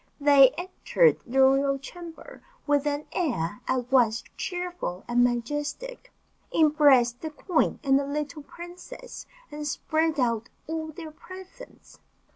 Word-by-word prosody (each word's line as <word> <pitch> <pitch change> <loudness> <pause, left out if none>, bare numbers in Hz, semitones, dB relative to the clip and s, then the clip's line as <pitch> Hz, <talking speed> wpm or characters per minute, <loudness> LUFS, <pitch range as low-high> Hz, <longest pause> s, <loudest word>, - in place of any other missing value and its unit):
They 280 -2 +7
entered 375 +7 +2
the 265 +3 +2
royal 275 +1 +4
chamber 340 - -11 0.2
with 290 0 +1
an 290 +1 -2
air 220 - -2
at 255 -1 -1
once 230 -4 +3
cheerful 355 - -4
and 245 0 +3
majestic, 295 - -3 0.4
embraced 285 -6 +4
the 315 - -4
queen 320 +2 0
and 270 -1 +4
the 280 - -3
little 300 +1 -4
princess, 355 +11 -11 0.2
and 295 0 -5
spread 315 0 0
out 235 -2 0 0.2
all 320 0 -4
their 315 0 -9
presents. 375 +9 -13
295 Hz, 125 wpm, -26 LUFS, 265-340 Hz, 0.4 s, They